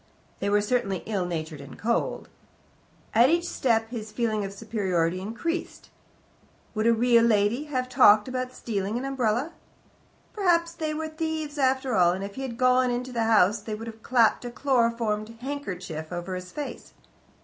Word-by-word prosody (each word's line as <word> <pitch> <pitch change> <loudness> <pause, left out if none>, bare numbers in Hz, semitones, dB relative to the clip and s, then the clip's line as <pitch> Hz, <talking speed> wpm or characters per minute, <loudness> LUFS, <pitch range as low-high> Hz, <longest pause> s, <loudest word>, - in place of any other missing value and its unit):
They 200 - -1
were 205 0 +3
certainly 205 -4 -1
ill 195 -5 -1
natured 160 -3 -4
and 140 - -11
cold. 235 +2 -1 0.9
At 235 +4 +6
each 340 +2 +1
step 225 -6 0
his 220 -3 -6
feeling 215 -2 -1
of 195 - -4
superiority 190 -5 -1
increased. 235 - -4 0.8
Would 215 0 0
a - - +6
real 235 0 +4
lady 225 +4 +2
have 255 -4 -2
talked 215 -4 +6
about 255 0 -3
stealing 210 -3 -3
an 255 - -3
umbrella? 265 +3 0 0.8
Perhaps 340 -4 +2
they 310 -2 -3
were 315 +1 -3
thieves 315 -1 -4
after 260 -1 +1
all, 175 -3 +4
and 190 +2 -4
if 200 0 -6
he 265 - -7
had 250 -4 -5
gone 255 0 +4
into 245 +1 -3
the 230 -2 0
house 210 -1 +4
they 210 0 -5
could 225 - -7
have 225 -1 -9
clapped 235 -1 +3
a 245 - -4
chloroformed 230 -4 0
handkerchief 185 - -5
over 175 +1 -4
his 180 0 -6
face. 295 -1 -7
230 Hz, 170 wpm, -26 LUFS, 205-260 Hz, 0.9 s, At